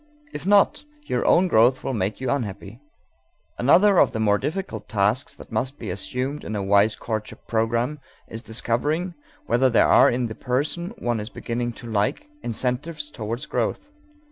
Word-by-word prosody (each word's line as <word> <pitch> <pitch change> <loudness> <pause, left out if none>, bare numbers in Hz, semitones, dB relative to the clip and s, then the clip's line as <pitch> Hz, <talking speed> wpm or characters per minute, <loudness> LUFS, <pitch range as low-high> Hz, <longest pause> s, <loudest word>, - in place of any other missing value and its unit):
If - - -6
not, 205 +7 +4 0.2
your - - -1
own 180 +2 +5
growth 125 -3 +4
will 135 - -2
make 100 -2 -2
you 130 -2 -1
unhappy._ 105 -4 -4 0.8
Another 185 +10 +5
of - - +4
the 110 - -2
more 105 -2 +3
difficult 150 - -4
tasks 105 +5 +1
that - - -14
must 130 +5 -2
be - - -5
assumed 125 +9 -3
in 110 - -5
a 100 - -2
wise 100 +2 +4
courtship 110 -2 -5
program 115 +6 0 0.3
is 115 - -7
discovering 145 +10 -1 0.3
whether 125 +3 +3
there 115 - +4
are 135 +3 +6
in 125 0 0
the 110 - -4
person 145 +9 -1
one 120 - -1
is 105 +2 -5
beginning 120 -1 -3
to 120 - -12
like 110 - -1
incentives 145 +6 -2
toward 115 +4 -5
growth. 290 - -2
120 Hz, 170 wpm, -24 LUFS, 110-145 Hz, 0.8 s, are